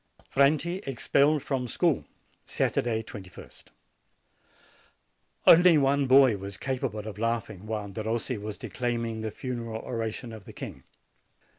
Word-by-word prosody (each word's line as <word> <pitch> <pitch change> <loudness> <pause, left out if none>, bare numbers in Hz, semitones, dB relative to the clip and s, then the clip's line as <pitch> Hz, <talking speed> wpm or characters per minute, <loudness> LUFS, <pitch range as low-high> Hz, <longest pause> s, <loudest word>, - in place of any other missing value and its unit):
FRANTI 155 +7 +2
EXPELLED 140 +3 +2
FROM 130 -3 -2
SCHOOL - - +1 0.4
Saturday, 115 -1 0
2ist. 95 -4 -11 1.8
Only 175 -1 +8
one 140 0 +2
boy 130 -4 +6
was 100 0 -6
capable 125 -5 -3
of 105 -2 -7
laughing 110 -3 -2
while 105 -2 -3
Derossi 110 +3 -2
was 105 0 -6
declaiming 115 -2 -3
the 110 - -2
funeral 115 -3 -5
oration 115 0 -4
of 110 -3 -10
the - - -11
king. - - -8
115 Hz, 120 wpm, -28 LUFS, 110-135 Hz, 1.8 s, Only